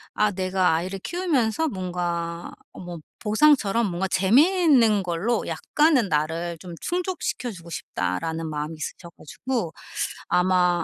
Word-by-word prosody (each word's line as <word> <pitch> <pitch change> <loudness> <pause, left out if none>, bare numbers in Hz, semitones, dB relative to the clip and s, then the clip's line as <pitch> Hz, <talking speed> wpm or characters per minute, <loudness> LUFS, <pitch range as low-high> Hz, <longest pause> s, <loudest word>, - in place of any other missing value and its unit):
아 210 -1 +3
내가 185 -3 +1
아이를 185 +4 -3
키우면서 320 - 0
뭔가 175 -3 -3 0.2
어 - - -11
뭐 175 -2 -7 0.2
보상처럼 230 -1 +3
뭔가 185 +1 -2
재미있는 245 - +4
걸로 180 +7 -1
약간은 295 - +2
나를 165 +3 -1
좀 175 -2 -9
충족시켜 355 -8 -2
주고 170 -3 -11
싶다.'라는 160 - -3
마음이 150 +1 -4
있으셔 170 +3 -7
가지고 220 - -4 0.6
아마 180 -1 +3
185 Hz, 295 characters per minute, -24 LUFS, 170-240 Hz, 0.6 s, 재미있는